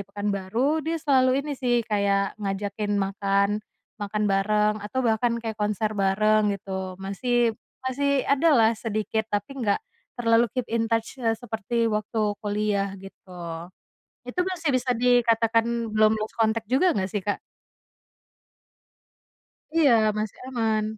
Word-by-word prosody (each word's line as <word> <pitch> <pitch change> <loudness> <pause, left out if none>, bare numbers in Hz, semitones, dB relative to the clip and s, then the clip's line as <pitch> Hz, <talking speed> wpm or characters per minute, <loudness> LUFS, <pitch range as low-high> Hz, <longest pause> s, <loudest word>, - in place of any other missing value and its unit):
Pekanbaru, 205 +8 -1
dia 325 +2 -2
selalu 270 -3 +3
ini, 300 - -3
sih, 240 -3 +1
kayak 200 -2 +1
ngajakin 205 +1 -2
makan, 200 +1 +1 0.4
makan 210 +1 -1
bareng 210 +2 +2
atau 250 +6 -3
bahkan 235 +1 +2
kayak 220 -1 -4
konser 210 +1 0
bareng, 210 +2 +2
gitu, 190 -1 -5
masih 235 +5 0 0.3
masih 275 +1 +1
ada 280 +4 +3
lah 225 -1 +5
sedikit, 220 0 -2
tapi 205 +2 -2
nggak 205 -3 +2 0.4
terlalu 230 0 +3
keep 250 - 0
in 225 -1 +1
touch 230 +3 -2
se 225 -2 +1
seperti 230 0 -2
waktu 215 +1 -2 0.2
kuliah, 205 -1 0
gitu, 195 0 -14 1.0
itu 250 +9 -3
masih 340 -4 -3
bisa 255 0 0
dikatakan 230 -2 +3 0.3
belum 215 0 +4
lost 215 0 -4
contact 220 0 +2
juga 350 +8 +3
nggak 190 -1 -1
sih, 205 - -1
Kak? 205 +2 -2 2.4
Iya, 300 -5 +5 0.3
masih 215 -1 -3
aman. 220 -4 0
220 Hz, 130 wpm, -25 LUFS, 205-245 Hz, 2.4 s, lah